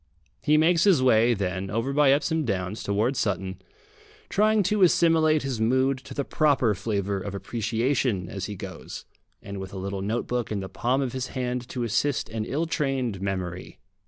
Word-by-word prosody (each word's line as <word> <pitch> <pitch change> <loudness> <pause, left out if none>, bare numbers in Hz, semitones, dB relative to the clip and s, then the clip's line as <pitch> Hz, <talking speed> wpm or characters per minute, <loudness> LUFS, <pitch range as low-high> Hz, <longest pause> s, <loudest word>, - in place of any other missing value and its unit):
He 150 +1 +3
makes 165 +2 +4
his 175 -10 +5
way, 120 -1 +4
then, 95 -1 -3
over 115 +7 -1
by 145 -1 +4
Epsom 155 +3 +1
Downs 100 -3 -2
towards 110 +6 0
Sutton, 95 -2 -2 0.7
trying 215 +1 +3
to 205 +3 +1
assimilate 165 -4 +4
his 130 -5 -3
mood 130 +3 +2
to 130 - -11
the 140 - -1
proper 140 -8 +2
flavour 100 -1 -2
of 100 +1 -5
appreciation 115 0 -1
as 95 0 -5
he 105 - -5
goes, - - -8 0.4
and 100 -1 -6
with 95 0 -7
a - - -6
little 95 +1 -4
notebook 120 +3 -2
in 105 - -1
the 95 0 -6
palm 125 +8 0
of 125 - -3
his 130 -1 -3
hand 125 -1 -2
to 125 - -3
assist 125 +5 0
an 110 -1 -3
ill 155 +8 -1
trained 135 - -1
memory. 90 -2 -4
120 Hz, 180 wpm, -26 LUFS, 100-140 Hz, 0.7 s, his